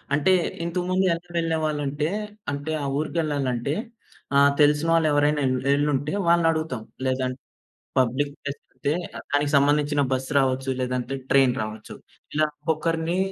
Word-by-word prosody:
అంటే 170 Hz, +6 st, +3 dB, 0.3 s
ఇంతకుముందు 180 Hz, +2 st, 0 dB
ఎలా 170 Hz, +1 st, -6 dB
వెళ్ళేవాళ్ళంటే, 155 Hz, -2 st, -1 dB, 0.4 s
అంటే 145 Hz, +3 st, -4 dB
ఆ -, -, -2 dB
ఊరికెళ్లాలంటే 145 Hz, -4 st, -1 dB, 0.6 s
ఆహ్, 140 Hz, 0 st, +6 dB
తెలిసిన 150 Hz, +2 st, +4 dB
వాళ్ళెవరైనా 150 Hz, -2 st, +3 dB
ఎల్ 130 Hz, 0 st, +1 dB, 0.2 s
ఎళ్లుంటే 145 Hz, +2 st, 0 dB
వాళ్ళని 170 Hz, -1 st, +4 dB
అడుగుతాం. 155 Hz, -7 st, -3 dB, 0.2 s
లేదంటే, 130 Hz, 0 st, -1 dB, 0.6 s
పబ్లిక్ 135 Hz, +3 st, +1 dB
ప్లేస్ 140 Hz, 0 st, -5 dB
అంటే 145 Hz, -, -1 dB, 0.4 s
దానికి 145 Hz, 0 st, +1 dB
సంబంధించిన 145 Hz, +1 st, +3 dB
బస్ 130 Hz, 0 st, -1 dB
రావచ్చు, 130 Hz, 0 st, +1 dB
లేదంటే 125 Hz, +1 st, -2 dB, 0.2 s
ట్రైన్ 135 Hz, -3 st, +5 dB
రావొచ్చు. 110 Hz, 0 st, -6 dB, 0.4 s
ఇలా 155 Hz, 0 st, +3 dB, 0.2 s
ఒక్కొక్కరిని 165 Hz, +2 st, 0 dB
145 Hz, 120 wpm, -24 LUFS, 135-160 Hz, 0.6 s, ఆహ్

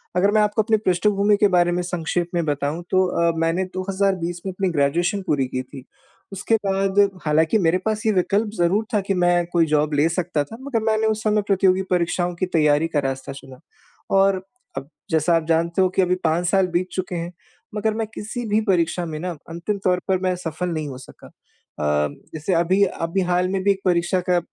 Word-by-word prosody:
अगर 200 Hz, +3 st, +3 dB
मैं 215 Hz, 0 st, +3 dB
आपको 210 Hz, +1 st, +2 dB
अपनी 220 Hz, 0 st, +2 dB
पृष्ठभूमि 200 Hz, +3 st, +2 dB
के 205 Hz, -1 st, +4 dB
बारे 175 Hz, -2 st, +3 dB
में 180 Hz, +1 st, 0 dB
संक्षेप 175 Hz, 0 st, -2 dB
में 170 Hz, -2 st, 0 dB
बताऊँ 145 Hz, +3 st, -2 dB
तो 185 Hz, 0 st, +4 dB
अ, 170 Hz, -1 st, +1 dB
मैंने 165 Hz, +3 st, +1 dB
2020 185 Hz, -2 st, -1 dB
में 190 Hz, -, -2 dB
अपनी 190 Hz, 0 st, -1 dB
ग्रेजुएशन 170 Hz, +7 st, +1 dB
पूरी 135 Hz, -4 st, +1 dB
की 130 Hz, 0 st, -3 dB
थी, 130 Hz, 0 st, -12 dB, 0.5 s
उसके 200 Hz, +4 st, 0 dB
बाद 195 Hz, 0 st, +1 dB, 0.3 s
हालाँकि 160 Hz, +7 st, +3 dB
मेरे 170 Hz, 0 st, +2 dB
पास 215 Hz, 0 st, -1 dB
ये 220 Hz, -, +4 dB
विकल्प 200 Hz, +3 st, +1 dB
ज़रूर 185 Hz, +6 st, +2 dB
था 210 Hz, -, +2 dB
कि 195 Hz, 0 st, -1 dB
मैं 175 Hz, -1 st, +2 dB
कोई 170 Hz, -2 st, +4 dB
जॉब 150 Hz, -1 st, +1 dB
ले 145 Hz, +3 st, +3 dB
सकता 170 Hz, -4 st, -1 dB
था, 225 Hz, +11 st, -11 dB
मगर 265 Hz, -5 st, -2 dB
मैंने 220 Hz, 0 st, +2 dB
उस 220 Hz, 0 st, -1 dB
समय 210 Hz, -1 st, +2 dB
प्रतियोगी 190 Hz, -1 st, +3 dB
परीक्षाओं 175 Hz, 0 st, 0 dB
की 185 Hz, -, -1 dB
तैयारी 155 Hz, -3 st, +2 dB
का 160 Hz, -3 st, 0 dB
रास्ता 135 Hz, 0 st, -3 dB
चुना 135 Hz, -1 st, -12 dB, 0.6 s
और 195 Hz, -1 st, +3 dB, 0.4 s
अब 135 Hz, +2 st, -6 dB, 0.2 s
जैसा 160 Hz, +2 st, +3 dB
आप 165 Hz, -, +1 dB
जानते 170 Hz, +2 st, +1 dB
हो 185 Hz, -, +3 dB
कि 190 Hz, -, +1 dB
अभी 180 Hz, 0 st, +2 dB
5 165 Hz, +2 st, +1 dB
साल 190 Hz, +1 st, +3 dB
बीत 180 Hz, +1 st, +1 dB
चुके 185 Hz, -1 st, -3 dB
हैं, 170 Hz, +1 st, -4 dB, 0.4 s
मगर 215 Hz, +1 st, 0 dB
मैं 225 Hz, 0 st, -2 dB
किसी 240 Hz, +3 st, -5 dB
भी 210 Hz, +1 st, +3 dB
परीक्षा 175 Hz, -2 st, +1 dB
में 155 Hz, -2 st, -5 dB
ना 180 Hz, +2 st, -3 dB, 0.2 s
अंतिम 170 Hz, +5 st, -3 dB
तौर 180 Hz, -1 st, +2 dB
पर 190 Hz, -1 st, +1 dB
मैं 185 Hz, -1 st, 0 dB
सफल 175 Hz, 0 st, -4 dB
नहीं 155 Hz, -3 st, -3 dB
हो 130 Hz, -2 st, -7 dB
सका। 130 Hz, -, -14 dB
अ, 75 Hz, 0 st, -3 dB, 0.2 s
जैसे 160 Hz, +4 st, -2 dB
अभी 175 Hz, +4 st, +3 dB
अभी 175 Hz, 0 st, -2 dB
हाल 180 Hz, +1 st, +2 dB
में 190 Hz, 0 st, -1 dB
भी 200 Hz, -, +4 dB
एक 195 Hz, -, -1 dB
परीक्षा 175 Hz, 0 st, +2 dB
का 180 Hz, -1 st, +4 dB
180 Hz, 210 wpm, -22 LUFS, 165-195 Hz, 0.6 s, के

